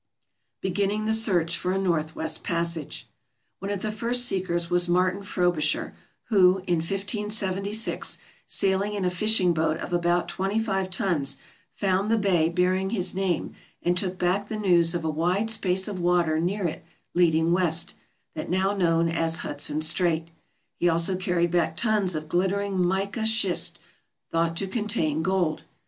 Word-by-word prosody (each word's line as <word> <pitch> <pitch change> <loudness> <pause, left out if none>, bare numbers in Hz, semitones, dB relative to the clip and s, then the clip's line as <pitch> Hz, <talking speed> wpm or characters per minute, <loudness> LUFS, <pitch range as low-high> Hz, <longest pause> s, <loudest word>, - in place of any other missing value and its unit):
Beginning 200 +3 0
the 220 - +2
Search 180 -7 +1
for 180 - -1
a - - 0
Northwest 160 -3 -1
Passage 170 -3 -2 0.5
One 195 - -5
of 200 -2 -3
the 215 - -1
first 235 +3 0
seekers 180 -5 -1
was 175 0 +1
Martin 185 +2 +2
Frobisher, 175 -6 0 0.4
who, 190 -3 +5
in 175 - +1
1576, 200 +3 -2 0.3
sailing 200 +1 0
in 195 -2 -1
a 180 - +1
fishing 185 -1 +3
boat 160 -1 +1
of - - -6
about 175 0 +2
25 195 -1 -1
tons, 170 - 0 0.4
found 195 +1 +1
the 225 - +3
bay 180 -6 +2
bearing 185 +2 +1
his 190 -4 0
name 185 -3 -1 0.3
and 175 +1 +2
took 185 0 -1
back 185 +3 0
the 215 - -4
news 175 -4 +3
of 170 -2 -2
a - - +1
wide 180 +8 0
space 190 -3 0
of 200 -3 -4
water 175 -3 +2
near 185 +4 -1
it 160 +1 -6 0.3
leading 165 -1 +3
west, 170 -2 +1 0.4
that 155 - -5
now 190 +3 +1
known 170 -4 +2
as 165 0 0
Hudson 150 +1 -1
Strait; 165 0 +1 0.5
he 175 - +3
also 170 +3 +1
carried 180 -2 0
back 175 -1 +1
tons 210 -6 +1
of 155 0 -4
glittering 190 +2 0
mica 195 +5 -1
schist 215 -5 0 0.5
thought 165 0 0
to 195 - -1
contain 190 -7 0
gold. 180 -3 0
180 Hz, 155 wpm, -26 LUFS, 170-195 Hz, 0.5 s, who